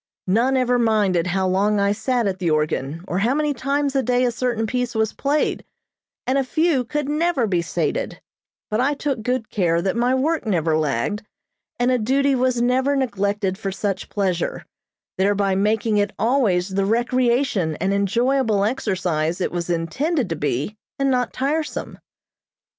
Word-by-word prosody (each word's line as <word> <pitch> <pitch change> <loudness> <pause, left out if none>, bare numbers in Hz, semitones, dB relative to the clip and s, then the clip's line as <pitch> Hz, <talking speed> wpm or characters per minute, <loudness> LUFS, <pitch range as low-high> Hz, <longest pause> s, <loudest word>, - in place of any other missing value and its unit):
None 235 +8 +2
ever 250 -1 +2
minded 205 -7 +2
how 190 +1 0
long 200 +3 +2
I 200 0 +2
sat 230 +3 0
at 190 -2 -1
the 175 -3 0
organ, 155 +1 -1
or 180 - -1
how 235 +7 +2
many 300 -1 +1
times 280 +2 -1
a 270 - +3
day 250 0 +1
a 245 - +1
certain 235 -1 -1
piece 245 +1 -2
was 220 -1 +1
played, 290 +2 0 0.6
and 265 +2 +1
a - - +1
few 310 0 +1
could 295 +3 -3
never 300 -3 +1
be 180 -5 +1
sated; - - -2 0.5
but 215 +3 +1
I 285 +3 +1
took 275 -5 -2
good 250 0 -2
care 170 -4 +1
that 190 +4 -1
my 245 +2 +2
work 310 +5 0
never 165 -8 +1
lagged, 155 - -1 0.6
and 245 +1 +2
a 250 - +2
duty 275 +5 +2
was 255 -2 +1
never 260 +3 +2
neglected 205 -6 -1
for 195 -3 -3
such 195 0 -3
pleasure, 185 -4 -1 0.5
thereby 200 0 +2
making 210 +2 +1
it 205 +1 0
always 215 -7 +2
the 195 +1 0
recreation 240 - +1
and 190 +5 -1
enjoyable 225 +2 +1
exercise 180 -8 -1
it 185 - -1
was 175 0 -3
intended 215 - -1
to 165 - -1
be 150 - -2 0.2
and 275 -1 +1
not 250 -2 0
tiresome. 295 +4 -2
220 Hz, 170 wpm, -22 LUFS, 190-260 Hz, 0.6 s, a